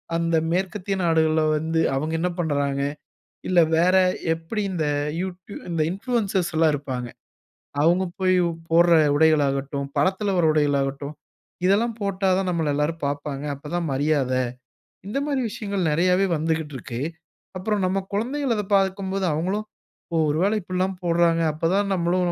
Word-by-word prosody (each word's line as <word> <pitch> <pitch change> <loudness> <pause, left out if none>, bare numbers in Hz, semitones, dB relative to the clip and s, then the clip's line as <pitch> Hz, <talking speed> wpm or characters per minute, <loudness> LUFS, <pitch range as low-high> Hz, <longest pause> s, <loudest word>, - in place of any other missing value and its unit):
அந்த 165 0 +1 0.2
மேற்கத்திய 195 +2 -1
நாடுகள்ல 160 -1 +3
வந்து 160 +1 0
அவங்க 155 +4 -2
என்ன 180 +1 0
பண்றாங்க? 140 -3 0 0.7
இல்ல 180 -2 +5 0.2
வேற 180 +3 +4 0.4
எப்டி 165 +7 -4
இந்த 160 -4 -1 0.3
யூடி 185 +1 -6 0.2
இந்த 165 -2 0
இன்புளூயன்சர்ஸ் 195 -4 -1
எல்லா 160 0 +4
இருப்பாங்க. 130 -4 -4 0.8
அவுங்க 175 +3 +3 0.2
போயி 185 0 +3 0.3
போட்ற 170 +1 +5 0.2
உடைகள் 155 -1 +4
ஆகட்டும், 140 0 -2
படத்துல 190 +2 +1
வர்ற 170 -3 +3
உடைகள் 145 -2 +2
ஆகட்டும், 140 +2 -4 0.5
"இதெல்லாம் 220 +4 +2
போட்டாதான் 190 -1 +1
நம்மள 160 -4 0
எல்லாரும் 150 +3 -1
பார்ப்பாங்க 145 0 -4
அப்பதான் 160 +4 -4
மரியாத" 140 -2 +1 0.7
இந்த 220 - -3
மாதிரி 275 -3 0
விஷயங்கள் 200 -6 -2
நெறையவே 180 +4 +3
வந்துகிட்டு 160 -1 -2
இருக்கு. 120 +1 -6 0.6
அப்புறம் 200 +1 -1
நம்ம 195 +1 0
குழந்தைகள் 255 +5 0
அத 210 - -1
பார்க்கும்போது 195 0 0
அவுங்களும், 190 +7 -1 0.5
"ஓ! - - +1
ஒருவேள 180 +8 +1
இப்டிலாம் 185 +1 -2
போட்றாங்க 165 -1 +3
அப்பதான் 190 +6 0
நம்மளும்" 175 0 +1
170 Hz, 135 wpm, -24 LUFS, 155-190 Hz, 0.8 s, இல்ல